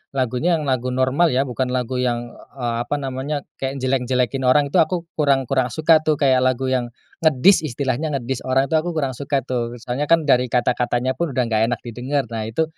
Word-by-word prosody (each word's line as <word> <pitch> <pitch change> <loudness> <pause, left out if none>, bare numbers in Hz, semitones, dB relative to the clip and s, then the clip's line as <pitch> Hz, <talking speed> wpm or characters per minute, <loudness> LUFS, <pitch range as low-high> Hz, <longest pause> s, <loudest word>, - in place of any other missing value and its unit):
lagunya, 130 +7 +1
yang 155 - -3
lagu 130 -3 -1
normal 130 +6 +2
ya, 135 - +3
bukan 130 -1 -2
lagu 125 0 -2
yang, 120 -1 -1 0.2
eee, 120 -3 -2
apa - - -1
namanya, 140 +1 -3 0.2
kayak 135 0 -3
jelek-jelekin 130 0 0
orang 140 +2 +3
itu 180 - +3
aku 170 +1 +1 0.2
kurang 140 -3 +3
kurang 130 0 0
suka 155 +6 +3
tuh 155 0 +1
kayak 135 -3 +3
lagu 130 0 0
yang 125 -2 0 0.3
ngedis, 160 +3 +4
istilahnya 135 +3 -2
ngedis, 130 -1 -3
orang 135 +2 +1
itu - - +3
aku 170 +1 -4
kurang 140 -4 0
suka 140 +1 -2
tuh. 120 -2 -3
Soalnya 135 +5 -2
kan 165 0 +4
dari 125 -3 +3
kata-katanya 125 +1 0
pun 155 -1 -3
udah 125 - +2
enggak 110 -1 +1
enak 120 0 -2
didengar. 125 +4 -2
Nah 110 -1 -3
itu, 115 +8 0
130 Hz, 200 wpm, -21 LUFS, 125-145 Hz, 0.3 s, ngedis